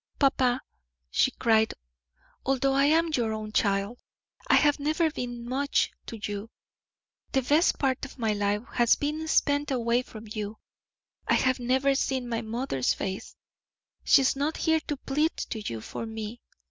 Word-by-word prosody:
"Papa," 260 -3 +3 0.5
she - - +3
cried, 220 -1 +2 0.7
"although 270 0 +1
I 275 +1 +4
am 325 +2 +3
your 230 -5 +1
own 215 0 -5
child, 200 +2 0 0.5
I - - +5
have 290 -1 +4
never 310 +2 +1
been 245 -5 -5
much 275 +3 +1 0.2
to 230 - -6
you; 205 +1 -4 0.8
the 265 - +2
best 300 +7 +3
part 265 -2 0
of 275 - -7
my 225 -3 0
life 205 +1 0
has 240 -1 +4
been 305 +2 -3
spent 285 -2 +2
away 240 -2 +1
from 225 -3 -11
you; 210 0 -5 0.7
I - - +4
have 255 0 +2
never 260 +3 +2
seen 265 -2 -1
my 230 -1 -2
mother's 225 - -1
face; 190 0 -5 0.7
she 280 - +6
is 265 - +2
not 290 +3 -1
here 320 0 +2
to 295 - -2
plead 300 +4 0
to 220 - -4
you 115 - -5
for 230 - -6
me. 220 +1 -6
250 Hz, 160 wpm, -27 LUFS, 220-280 Hz, 0.8 s, she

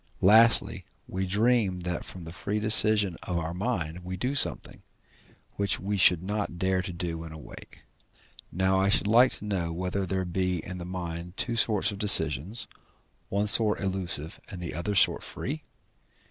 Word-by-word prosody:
Lastly, 110 +4 +4 0.2
we 95 0 -4
dream 105 -2 +1
that 90 0 -4
from 90 - -8
the 80 0 -10
free 105 +3 -3
decision 105 -3 +4
of 90 - -4
our 85 0 -4
mind 90 -5 -3
we 90 +1 -6
do 125 +8 -2
something, 140 - 0 0.8
which 100 -1 -1
we 100 +2 -3
should 90 -2 +5
not 100 -2 -4
dare 95 +1 0
to 95 0 -6
do 85 -1 -5
when 80 -1 -9
awake. 80 -1 -13 0.7
Now 95 +1 +1
I 95 +1 +1
should 100 - +1
like 120 +5 +4
to - - -8
know 90 -5 -3
whether 90 +3 -3
there 95 +1 -2
be 90 +1 -2
in 95 0 -7
the 85 - -7
mind 90 -1 -7
two 120 - -1
sorts 110 -2 +2
of 100 - -9
decisions, 90 - +3 0.6
one 100 +1 -1
sort 105 +1 +5
illusive, 90 -5 -3
and 95 - -8
the 85 -1 -6
other 85 +5 -3
sort 90 - +3
free? - - -5
95 Hz, 175 wpm, -27 LUFS, 85-105 Hz, 0.8 s, should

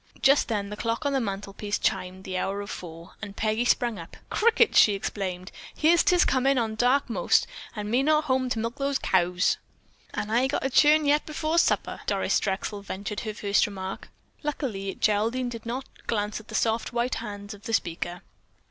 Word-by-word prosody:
Just 275 +2 +5
then 205 -3 -2
the - - -4
clock 230 +4 -2
on 285 - +1
the 270 - +2
mantelpiece 200 0 -3
chimed 185 0 -2
the 190 -1 -5
hour 195 +2 -1
of 200 - -7
four, 170 0 -9
and 205 -2 -7
Peggy 220 +3 0
sprang 235 -4 +1
up. 165 - -10
"Crickets!" 460 0 +4
she 210 - +6
exclaimed, 185 -2 -4 0.2
"Here 320 +3 +4
'tis 350 +1 +4
comin' 270 +1 +2
on 225 -2 0
dark 250 +5 +2
most, 230 - +2 0.3
and 210 -1 -4
me 245 +3 +3
not 305 +2 +3
home 260 -3 0
to 245 - -1
milk 230 +3 -3
the 280 -1 0
caows." 180 0 +2 0.6
"An' 210 - -3
I've 250 +4 +3
got - - -1
to 270 - -1
churn 300 +3 +5
yet 295 +1 +2
before 310 +2 0
supper," - - +1
Doris - - +1
Drexel 200 +1 -3
ventured 200 +1 -5
her 215 -2 -4
first 205 0 +2
remark. 190 -1 -6 0.3
Luckily 235 -10 -3
Geraldine 225 +4 +1
did 230 -1 -8
not 255 +3 -3 0.2
glance 210 -1 -1
at 215 - -15
the - - -7
soft, 225 0 0
white 240 +1 0
hands 205 -2 -7
of 205 0 -14
the - - -4
speaker. 175 -3 -2
220 Hz, 190 wpm, -26 LUFS, 200-265 Hz, 0.6 s, she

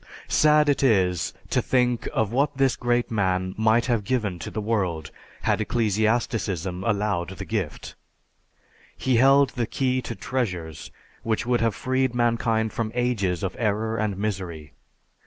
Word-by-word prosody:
"Sad 150 0 +4
is 95 - +2 0.2
it - - -22
to - - +2
think 125 -2 +1
of 110 -2 0
what 140 +3 +1
this 135 -3 +3
great 120 0 0
man 95 -3 0
might 110 +2 +3
have 120 -4 0
given 105 -6 -1
to 75 - -6
the - - -4
world 95 -8 -1 0.3
had - - +1
ecclesiasticism 110 - 0
allowed 100 -4 -1
the - - -6
gift. 100 -9 -4 1.0
He 130 -2 +1
held 135 +2 +5
the 120 -3 -2
key 130 0 0
to 115 - -6
treasures 90 - -4 0.3
which 110 -1 -1
would 120 -1 +1
have 115 -2 +1
freed 130 -1 0
mankind 115 -2 +1
from 110 -2 -2
ages 105 -8 0
of 95 - -2
error 110 0 0
and 105 -3 -1
misery. 90 -7 -4
110 Hz, 150 wpm, -25 LUFS, 95-120 Hz, 1.0 s, held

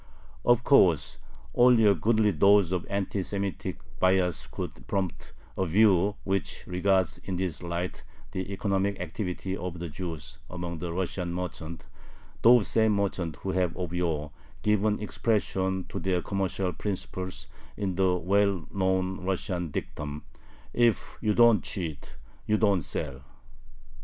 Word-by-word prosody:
Of 120 0 +4
course, 85 - +4 0.3
only 120 -2 +6
a 100 - +7
goodly 110 +4 +2
dose 100 +2 +5
of 90 -2 -2
anti 100 0 -1
Semitic 100 0 -3 0.2
bias 90 -2 +2
could - - -7
prompt 95 -3 -3 0.2
a - - 0
view 100 +1 +4
which 95 0 -2
regards 95 0 +1
in 95 - -5
this 90 -3 -2
light 85 +1 -3 0.3
the 95 +1 -4
economic 100 0 0
activity 90 +1 -3
of 90 -2 -5
the 85 0 -5
Jews 80 -2 -6
among 85 -2 -5
the 85 0 -4
Russian 90 0 -2
merchants, 85 -2 -5 0.6
those 120 -2 +6
same 110 -1 +3
merchants 95 -6 -1
who 95 - -1
had 90 -2 0
of 90 -2 -4
yore 80 -4 -1 0.3
given 105 0 +2
expression 95 -4 0
to 95 - -4
their 90 0 0
commercial 95 -1 -1
principles 95 0 -4 0.3
in 100 -3 -1
the 95 0 +2
well 95 0 +1
known 95 -1 0
Russian 90 -2 -2
dictum, 75 0 -5 0.5
"If 120 -2 +1
you 105 -2 +1
don't 120 -2 +6
cheat, 80 -7 -5 0.3
you 110 - +3
don't 100 -4 +3
sell." 70 -2 -4
95 Hz, 135 wpm, -28 LUFS, 90-100 Hz, 0.6 s, a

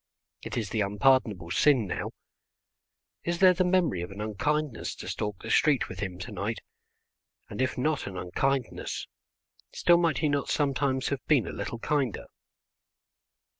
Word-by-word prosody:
It - - -5
is 110 -5 -2
the 110 - 0
unpardonable 105 -4 +2
sin 130 +3 +4
now; 90 - -3 1.1
is 170 0 -1
there 185 0 +7
the 185 +1 +1
memory 180 - +2
of 90 - -5
an 100 +1 -9
unkindness 115 +6 -1
to - - -9
stalk 105 -2 -4
the 110 - -4
street 150 -4 +3
with - - -8
him 95 -3 -4
to 105 - -6
night? 105 +3 -3 0.9
And 105 - -3
if 130 - 0
not 150 +3 0
an 95 -2 -6
unkindness, 130 +9 -2 0.7
still 175 0 +5
might 165 -6 +2
he 155 - +1
not 145 -1 0
sometimes 140 -2 +1
have 140 -3 -3
been 140 -8 +4
a - - -5
little 120 - -4
kinder? 135 -2 -1
130 Hz, 160 wpm, -28 LUFS, 105-150 Hz, 1.1 s, there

